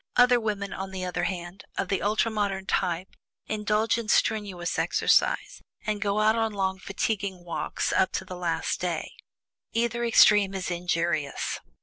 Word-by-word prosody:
Other 245 0 +6
women, 210 -3 -3
on 190 0 -5
the 190 -1 -4
other 180 -1 -1
hand, 175 +1 -5
of 195 - -1
the 195 - 0
ultra 215 +2 +1
modern 200 -3 -1
type, 180 0 -1 0.3
indulge 215 +1 +1
in 225 -2 -6
strenuous 200 -7 +1
exercise, - - +2 0.2
and 210 -1 -1
go 205 +1 +1
out 215 +1 +4
on 225 -1 0
long 190 -1 -1
fatiguing 195 -1 -3
walks 170 - -2
up 190 - +3
to 190 - -2
the 185 - -7
last 175 -2 -1
day. - - -2 0.6
Either 235 +1 0
extreme 210 -4 +5
is 185 -1 -3
injurious. 170 -4 -1
195 Hz, 155 wpm, -27 LUFS, 180-215 Hz, 0.6 s, Other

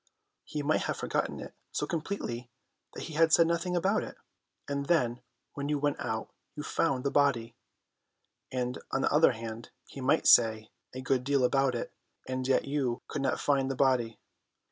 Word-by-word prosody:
He 150 -1 -4
might 155 +2 +2
have - - -1
forgotten - - -2
it - - -8 0.2
so - - -1
completely 150 -8 -4 0.5
that - - -6
he 160 - -7
said 165 +1 +5
nothing 170 +2 0
about 195 +5 +2
it; - - -9 0.5
and 140 0 -2
then 125 -8 +2 0.3
when 140 0 -4
you 150 - +1
went 145 0 0
out 110 -1 -4 0.2
you 150 - -5
found 140 -5 0
the 140 - 0
body; 135 -5 +2 1.0
and, 125 -1 -2
on 135 - 0
the - - +1
other 150 -3 +5
hand, 115 0 -7 0.2
he 135 - -10
might 140 +5 +2
say 110 -2 +5 0.2
a 130 - -6
great 130 -1 +1
deal 140 0 +2
about 135 0 +2
it, 120 - -4 0.3
and 130 0 -2
yet 130 - +2
you 135 -4 -1
could 145 - -4
not 135 - 0
find 135 -2 +1
the 135 - -2
body. 125 -4 +2
135 Hz, 180 wpm, -30 LUFS, 125-150 Hz, 1.0 s, said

